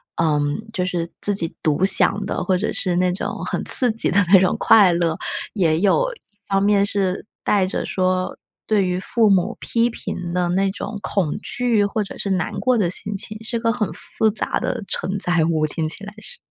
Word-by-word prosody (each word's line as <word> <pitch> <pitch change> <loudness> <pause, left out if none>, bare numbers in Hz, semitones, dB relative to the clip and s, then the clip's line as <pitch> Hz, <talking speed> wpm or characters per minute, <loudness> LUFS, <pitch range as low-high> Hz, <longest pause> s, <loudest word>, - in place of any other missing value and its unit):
嗯， 150 +6 -1
就 180 -3 -1
是 170 -2 -3
自 205 - 0
己 165 -4 -2
独 155 +3 +1
享 200 +1 +5
的， - - -3
或 185 0 +1
者 210 - -2
是 180 -2 -1
那 180 0 +1
种 185 - -5
很 - - -3
刺 250 -3 +7
激 225 - 0
的 200 +1 +3
那 190 - +9
种 185 - +1
快 200 -5 +5
乐， 170 -1 0 0.4
也 165 -6 +1
有 - - +1
一 - - -17 0.3
方 195 0 +1
面 200 -1 +3
是 195 -1 -2 0.2
带 200 -3 +2
着 - - -3
说， 185 -1 -1 0.3
对 205 -3 +2
于 180 0 -2
父 220 +2 +2
母 195 +5 +1
批 235 0 0
评 175 -6 -6
的 180 -1 0
那 195 +2 +1
种 210 +1 -6
恐 180 -7 -1
惧 230 -2 0
或 210 +1 -2
者 - - -10
是 200 - -3
难 185 -2 -1
过 255 -1 +1
的 190 -6 +1
心 200 +3 -6
情， 215 +2 -5
是 235 +1 -3
个 230 0 +1
很 220 -5 -2
复 220 - +1
杂 210 - +2
的 - - -3
承 190 +3 -3
载 175 -3 +3
物， 160 -2 0
听 155 +1 -3
起 195 +5 -7
来 210 - -9
是。 485 - -8
195 Hz, 225 characters per minute, -20 LUFS, 180-215 Hz, 0.4 s, 那